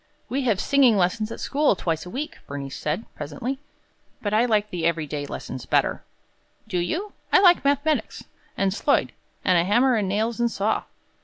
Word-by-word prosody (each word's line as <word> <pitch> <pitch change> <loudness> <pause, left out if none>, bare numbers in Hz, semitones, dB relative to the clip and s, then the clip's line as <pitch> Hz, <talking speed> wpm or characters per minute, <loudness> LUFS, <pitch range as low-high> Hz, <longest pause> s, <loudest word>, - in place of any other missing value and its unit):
"We 265 +4 0
have 215 -6 +2
singing 260 -3 +4
lessons 215 +4 +1
at - - -6
school 290 -6 +2
twice 165 -1 -2
a - - -7
week," 280 - -5
Bernice 140 -1 -6
said, 155 +9 -2
presently, 160 - -5 0.6
"but 205 -1 -3
I 225 +3 +4
like 210 -3 +1
the 175 -2 -3
every 165 -1 +1
day 145 0 -4
lessons 130 -2 -7
better." - - +1 0.6
"Do 180 - -1
you? 355 - -2 0.2
I - - +7
like 360 -2 +6
mathematics, 285 +2 0 0.3
and 195 -1 +1
sloyd, - - +1 0.3
and 180 -2 +4
a - - +3
hammer 240 +8 +3
and 210 -5 +1
nails 220 +4 -1
and 235 0 +2
saw. 215 0 -1
215 Hz, 180 wpm, -24 LUFS, 175-255 Hz, 0.6 s, I